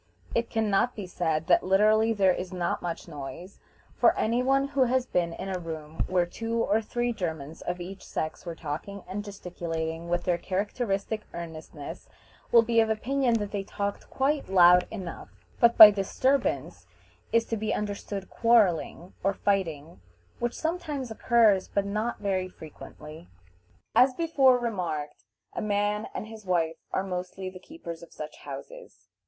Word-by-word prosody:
It 235 Hz, 0 st, 0 dB
can 220 Hz, -2 st, 0 dB
not 235 Hz, +6 st, +2 dB
be 205 Hz, -, -5 dB
said 165 Hz, -3 st, -1 dB
that 175 Hz, 0 st, +5 dB
literally 215 Hz, +4 st, +4 dB
there 195 Hz, -4 st, +4 dB
is 180 Hz, 0 st, -5 dB
not 180 Hz, -2 st, -2 dB
much 175 Hz, 0 st, -5 dB
noise, 165 Hz, +5 st, -8 dB, 0.3 s
for -, -, +3 dB
any 235 Hz, +3 st, +1 dB
one 270 Hz, +2 st, +2 dB
who 275 Hz, -2 st, +3 dB
has 255 Hz, +1 st, +1 dB
been 175 Hz, -8 st, 0 dB
in 190 Hz, -, -6 dB
a 185 Hz, -1 st, -2 dB
room 160 Hz, -2 st, -5 dB
where 180 Hz, -1 st, +2 dB
two 225 Hz, +6 st, -4 dB
or 215 Hz, +2 st, +2 dB
three 240 Hz, +2 st, -1 dB
Germans 160 Hz, -7 st, -5 dB
of 175 Hz, +1 st, -3 dB
each 190 Hz, +2 st, -8 dB
sex 155 Hz, 0 st, -4 dB
were 170 Hz, -2 st, -6 dB
talking 170 Hz, +6 st, -6 dB
and 200 Hz, +3 st, -4 dB
gesticulating 170 Hz, -4 st, -5 dB
with 175 Hz, 0 st, 0 dB
their 175 Hz, -1 st, +1 dB
characteristic 200 Hz, +2 st, -2 dB
earnestness 165 Hz, -2 st, -8 dB, 0.4 s
will 230 Hz, -1 st, +7 dB
be 230 Hz, 0 st, +2 dB
of 225 Hz, -1 st, +3 dB
opinion 245 Hz, +3 st, +1 dB
that 205 Hz, -2 st, -2 dB
they 205 Hz, -, -2 dB
talked 200 Hz, +1 st, -4 dB
quite 275 Hz, -3 st, 0 dB
loud 180 Hz, -1 st, +6 dB
enough; 190 Hz, -6 st, -7 dB, 0.3 s
but 235 Hz, 0 st, +5 dB
by 215 Hz, -1 st, +13 dB
disturbance 255 Hz, +7 st, 0 dB, 0.4 s
is 230 Hz, 0 st, +3 dB
to 225 Hz, -, -2 dB
be 215 Hz, 0 st, -2 dB
understood 205 Hz, -2 st, -3 dB
quarreling 195 Hz, -6 st, +2 dB
or 195 Hz, +1 st, +1 dB
fighting, 165 Hz, -, -1 dB, 0.4 s
which 240 Hz, 0 st, -1 dB
sometimes 310 Hz, -7 st, -3 dB
occurs, 220 Hz, -4 st, +3 dB
but 200 Hz, -1 st, -1 dB
not 215 Hz, +4 st, -2 dB
very 190 Hz, -2 st, -1 dB
frequently. 155 Hz, -, -12 dB, 0.6 s
As 255 Hz, 0 st, +5 dB
before 275 Hz, -6 st, +4 dB
remarked, 180 Hz, -11 st, -3 dB, 0.3 s
a -, -, -3 dB
man 210 Hz, 0 st, 0 dB
and -, -, -3 dB
his 220 Hz, 0 st, -11 dB
wife 170 Hz, -3 st, 0 dB
are 190 Hz, -, 0 dB
mostly 185 Hz, 0 st, -5 dB
the 185 Hz, -, -11 dB
keepers 175 Hz, -, -9 dB
of 170 Hz, -, -13 dB
such 150 Hz, 0 st, -8 dB
houses. -, -, -10 dB
195 Hz, 160 wpm, -27 LUFS, 175-230 Hz, 0.6 s, by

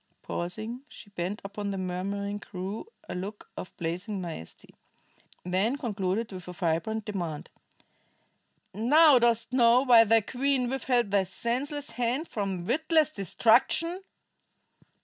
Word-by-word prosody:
Pausing, 215 Hz, +8 st, -4 dB
she 205 Hz, -, -13 dB
bent 190 Hz, +2 st, -4 dB
upon 200 Hz, +1 st, -4 dB
the 195 Hz, -, -3 dB
murmuring 200 Hz, +3 st, -3 dB
crew 195 Hz, -, -6 dB, 0.2 s
a -, -, -5 dB
look 195 Hz, +4 st, -7 dB
of -, -, -8 dB
blazing 180 Hz, +5 st, -3 dB
majesty; 165 Hz, -, -8 dB, 0.7 s
then 190 Hz, +9 st, 0 dB
concluded 215 Hz, -3 st, -2 dB
with 185 Hz, -2 st, -9 dB
a 180 Hz, -, -6 dB
vibrant 180 Hz, +5 st, -1 dB
demand: 175 Hz, -8 st, -4 dB, 1.2 s
"Now 275 Hz, -, +6 dB
dost 235 Hz, 0 st, +1 dB
know 240 Hz, -1 st, +5 dB
why 235 Hz, -4 st, +7 dB
thy 225 Hz, +1 st, +4 dB
queen 255 Hz, +2 st, 0 dB
withheld 250 Hz, -5 st, 0 dB
thy 200 Hz, -1 st, +4 dB
senseless 255 Hz, +9 st, -3 dB
hands 245 Hz, +7 st, -1 dB
from 195 Hz, -4 st, -3 dB
witless 315 Hz, -, +2 dB
destruction?" 240 Hz, -, +2 dB
215 Hz, 125 wpm, -28 LUFS, 185-245 Hz, 1.2 s, why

